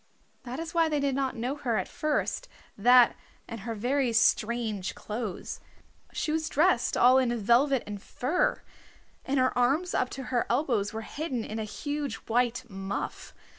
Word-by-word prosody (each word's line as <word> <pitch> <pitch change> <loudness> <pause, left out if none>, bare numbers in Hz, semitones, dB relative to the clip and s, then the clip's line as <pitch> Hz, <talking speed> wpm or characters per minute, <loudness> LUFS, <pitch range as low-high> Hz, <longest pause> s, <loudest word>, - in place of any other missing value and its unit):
That 250 +1 -5
is 330 0 -5
why 330 -1 +3
they 300 -1 0
did 280 -1 0
not 265 -1 -1
know 250 +4 -2
her 245 -6 -1
at 190 - -1
first, 305 -1 -1 0.3
that 245 +3 +6 0.3
and 230 - -6
her 225 +3 -5
very 250 +3 +1
strange 220 -3 +1
clothes. 215 -3 -5 0.5
She 305 - -2
was 315 0 -1
dressed 315 -4 +2
all 255 +2 +6
in 240 -2 +1
velvet 240 +5 +3
and 205 -1 -6
fur, 300 - -1 0.6
and 275 +1 0
her 255 0 +2
arms 275 +9 +2
up 250 - +1
to 265 - -5
her 240 - +1
elbows 235 -6 +1
were 225 - -5
hidden 260 0 -4
in 220 - -5
a 220 - -2
huge 290 +2 -4
white 245 +2 -1
muff. 195 -1 -5
245 Hz, 170 wpm, -28 LUFS, 225-280 Hz, 0.6 s, that